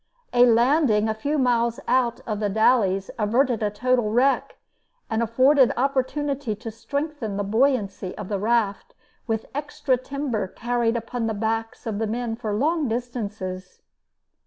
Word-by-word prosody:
A 245 0 +6
landing 235 -2 +3
a 220 - 0
few 285 +8 -2
miles 235 -3 +1
out 240 -2 +1
of 215 -3 -3
The 210 -1 0
Dalles 195 -3 +2
averted 235 +3 +2
a 210 - +1
total 240 +1 +1
wreck, 255 +5 +1 0.5
and 220 +1 +1
afforded 255 +4 +4
opportunity 275 -1 -1
to 225 +2 -7
strengthen 280 -2 -4
the 205 - -1
buoyancy 210 -4 0
of 195 - -6
the 200 -1 -2
raft 215 -1 0 0.3
with 225 -1 -1
extra 285 -2 -1
timber 255 -5 -3
carried 240 +2 -1
upon 230 0 -3
the 220 - -2
backs 225 +1 -3
of 215 -3 -3
the 225 - 0
men 230 +1 -2
for 225 -2 -4
long 295 +8 +1
distances. 210 -6 -5
230 Hz, 150 wpm, -24 LUFS, 215-255 Hz, 0.5 s, A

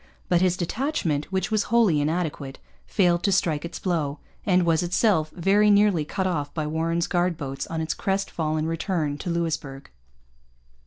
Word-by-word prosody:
But 175 -1 +3
his 185 -1 +2
detachment, 175 - -2
which 190 +5 -1
was 215 -2 +1
wholly 215 -10 +4
inadequate, 150 -3 -2 0.3
failed 175 -3 +2
to 200 - +1
strike 165 -5 +1
its 170 - -6
blow, 155 -6 -1 0.3
and 180 -2 +3
was 165 -2 +2
itself 175 -2 +2
very 195 +5 +3
nearly 200 -6 +4
cut 190 +5 -2
off 155 -6 -1
by 155 -2 -1
Warren's 165 +2 0
guard 175 -2 0
boats 135 -3 -5
on 165 -1 -3
its 160 - -1
crest 195 0 -2
fallen 155 -1 -1
return 160 -3 -2
to - - -4
Louisbourg. 160 -5 -3
170 Hz, 165 wpm, -25 LUFS, 155-190 Hz, 0.3 s, wholly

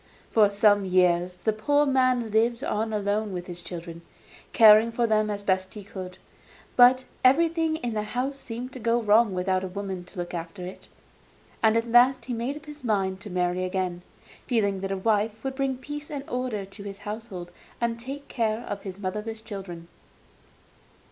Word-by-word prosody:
For 210 -2 +5
some 205 0 +4
years 180 -1 +2
the 220 +4 0
poor 290 +8 +2
man 255 -4 +2
lived 230 +3 +2
on 220 -2 -1
alone 205 0 -1
with 180 -1 -4
the 180 - -6
children, 170 -1 -7 0.5
caring 220 0 +7
for 235 +1 +1
them 215 -1 +2
as 205 -1 -4
best 190 +1 0
he 210 - -7
could; 185 -2 -8 0.6
but 255 +1 +6 0.2
everything 325 +4 +3
in 245 -7 -3
the 215 - -1
house 250 +6 -3
seemed 245 +2 -7
to 255 - -7
go 230 +1 +2
wrong 220 0 +4
without 185 +1 0
a - - -2
woman 190 -1 -5
to 180 - -14
look 175 0 -4
after 175 +2 -6
it, 185 - -10 0.7
and 220 0 +4
at 230 - +1
last 245 +1 +5
he 250 - -3
made 240 +5 -2
up 305 - -13
his 295 -1 -11
mind 195 -4 0
to 210 - -8
marry 180 0 0
again, 185 -1 -2 0.5
feeling 200 -6 +1
that 195 0 -3
a 195 - -1
wife 215 +2 0
would 270 0 -2
bring 265 -1 -1
peace 295 +3 -7
and 280 -1 -6
order 245 -5 -3
to 195 +2 -12
his 200 -1 -7
household 205 -5 -6 0.3
and 235 -1 -1
take 275 +4 -7
care 225 -2 -1
of 200 -1 -5
his 190 -2 -7
motherless 210 +3 -4
children. 190 -6 -8
215 Hz, 185 wpm, -26 LUFS, 190-245 Hz, 0.7 s, caring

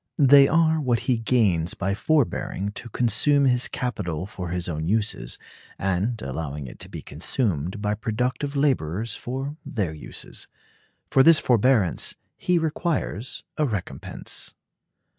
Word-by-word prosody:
They 140 -1 +7
are 160 0 +3
what 120 -5 +1
he 125 -2 +1
gains 105 -9 +2
by 95 +1 -1
forbearing 105 -4 0
to 115 +3 -8
consume 135 +6 +3
his 125 -1 +3
capital 90 - -3
for 90 -3 -6
his 90 0 -2
own 80 -2 -3
uses, 110 +2 0 0.4
and 95 +5 -1
allowing 70 +1 -4
it 65 - -10
to - - -7
be - - -8
consumed 95 - -1
by 105 0 +1
productive 125 +6 -2
laborers 115 - 0
for 135 +4 -5
their 100 - -2
uses. 75 - -6 0.6
For 135 - +6
this 165 +3 +8
forbearance 120 - +2 0.2
he 180 -1 +1
requires 160 - -1 0.2
a 150 - +3
recompense. 105 -7 -5
115 Hz, 135 wpm, -24 LUFS, 95-135 Hz, 0.6 s, this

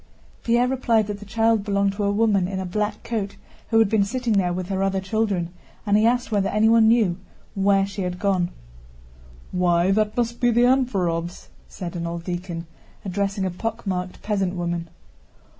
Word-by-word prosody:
Pierre 240 +1 +2
replied 240 -4 +2
that 205 0 -5
the 210 - -10
child 225 -1 +2
belonged 200 -1 +1
to 205 +1 -3
a 200 - +2
woman 205 -3 +2
in 190 0 -3
a 190 - -3
black 210 +3 -2
coat 205 -4 -3 0.3
who 225 - +3
had 225 -1 +5
been 210 0 +2
sitting 240 +2 -1
there 185 -3 +2
with 180 0 -3
her 190 -1 -1
other 195 0 +1
children, 195 -4 -1 0.3
and 205 -1 +2
he 215 +2 +4
asked 245 0 0
whether 200 -2 +1
anyone 220 +1 +4
knew 215 -6 +3 0.3
where 195 0 +3
she 200 0 -6
had 180 -1 -3
gone. 185 -2 +1 1.0
"Why, 180 0 +2
that 215 +2 +1
must 235 0 -1
be 245 - +4
the 240 +1 +3
Anférovs," 185 -10 0 0.2
said 180 -1 -7
an 170 -1 -3
old 170 0 -5
deacon, 175 -1 -5 0.4
addressing 195 +1 -1
a 185 - -1
pockmarked 195 -3 -4
peasant 195 -3 -1
woman. 170 -1 -3
200 Hz, 180 wpm, -23 LUFS, 180-225 Hz, 1.0 s, had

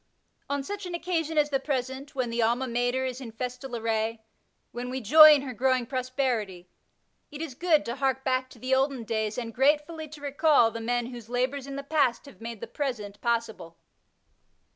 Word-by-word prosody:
On 280 -1 -1
such 405 +4 -5
an 350 - -4
occasion 330 -2 -2
as 295 0 +3
the 270 - +2
present, 265 +1 -3
when 250 -3 -1
the 235 0 0
Alma 240 +3 +1
Mater 245 +2 0
is 255 0 -4
in 235 -3 -7
festal 250 +2 -5
array, 225 0 -1 0.5
when 245 +1 -5
we 260 +1 -3
joy 305 +6 +9
in 280 - -1
her 260 -2 -5
growing 255 +1 +1
prosperity, 250 -8 -2 0.6
it 295 - -9
is 320 -4 -5
good 315 +2 +2
to 235 +3 -4
hark 265 -1 0
back 255 -1 0
to - - -15
the 255 +3 -2
olden 265 -2 +1
days 220 -1 -2
and 230 -2 -4
gratefully 300 +5 +1
to 305 0 -11
recall 285 -4 +3
the 230 - -6
men 240 +1 -1
whose 235 -2 -10
labours 255 +3 -1
in 275 - -6
the 280 - -5
past 280 -5 +1
have 280 -4 -15
made 230 -2 -7
the - - -3
present 225 -9 -4
possible. 220 -8 -2
255 Hz, 195 wpm, -27 LUFS, 235-280 Hz, 0.6 s, joy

